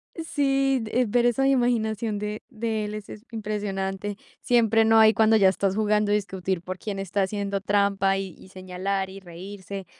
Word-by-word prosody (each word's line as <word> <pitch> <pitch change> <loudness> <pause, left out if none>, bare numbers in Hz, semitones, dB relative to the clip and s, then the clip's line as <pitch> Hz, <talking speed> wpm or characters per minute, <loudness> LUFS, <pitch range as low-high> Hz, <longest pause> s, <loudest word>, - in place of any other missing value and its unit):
Sí, 275 -5 +1
eh, 250 +3 +1
ver 240 +3 +2
esa 270 +3 +2
imaginación 230 -4 +1
de 210 +1 -4
de 220 -3 -2
él 210 - -5
es 210 -1 -8
es 210 - -10
impresionante. 205 -2 -3 0.2
Siempre 225 -3 +3
no 225 0 +5
hay 220 0 +7
cuando 220 0 +4
ya 195 -3 +6
estás 195 0 0
jugando, 210 -1 +1
discutir 190 -3 -1
por 185 +1 -6
quién 205 -2 -5
está 195 +1 -1
haciendo 200 0 -2
trampa 200 -1 +2
y 195 -1 -4
y 190 - -16
señalar, 190 +1 -3
y 195 - -9
reírse. 190 +2 -8
205 Hz, 175 wpm, -25 LUFS, 195-225 Hz, 0.2 s, hay